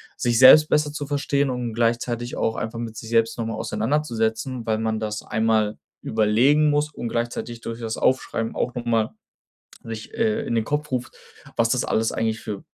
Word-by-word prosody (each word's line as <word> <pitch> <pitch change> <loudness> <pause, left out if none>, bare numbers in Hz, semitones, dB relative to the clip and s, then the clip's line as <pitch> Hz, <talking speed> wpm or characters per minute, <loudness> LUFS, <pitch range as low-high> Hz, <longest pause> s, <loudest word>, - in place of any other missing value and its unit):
sich 120 -1 +1
selbst 150 +4 +9
besser 150 -1 +2
zu 145 -1 -4
verstehen 140 -1 0
und 125 -2 -3
gleichzeitig 120 +1 -1
auch 110 - 0
einfach 115 +1 -4
mit 115 -1 -5
sich 110 +1 -8
selbst 115 0 +2
noch 115 - -2
mal 115 - -3
auseinanderzusetzen, 115 0 -1
weil 110 -1 +1
man 110 0 -1
das 105 -1 -3
einmal 110 -1 +1 0.2
überlegen 120 +8 +3
muss 150 +1 +1
und 120 - -5
gleichzeitig 120 0 -3
durch 115 0 -6
das 110 -1 -3
Aufschreiben 115 -3 0
auch 125 - -1
noch 120 -1 -4
mal 115 -2 +1 0.7
sich, 110 -1 -7
äh, 225 0 +1
in - - -2
den 110 -1 +1
Kopf 150 0 -2
ruft, 125 -1 -3 0.4
was 115 0 +2
das 125 +1 +1
alles 110 0 +1
eigentlich 110 -1 -1
für 100 -2 -6
115 Hz, 190 wpm, -23 LUFS, 110-130 Hz, 0.7 s, selbst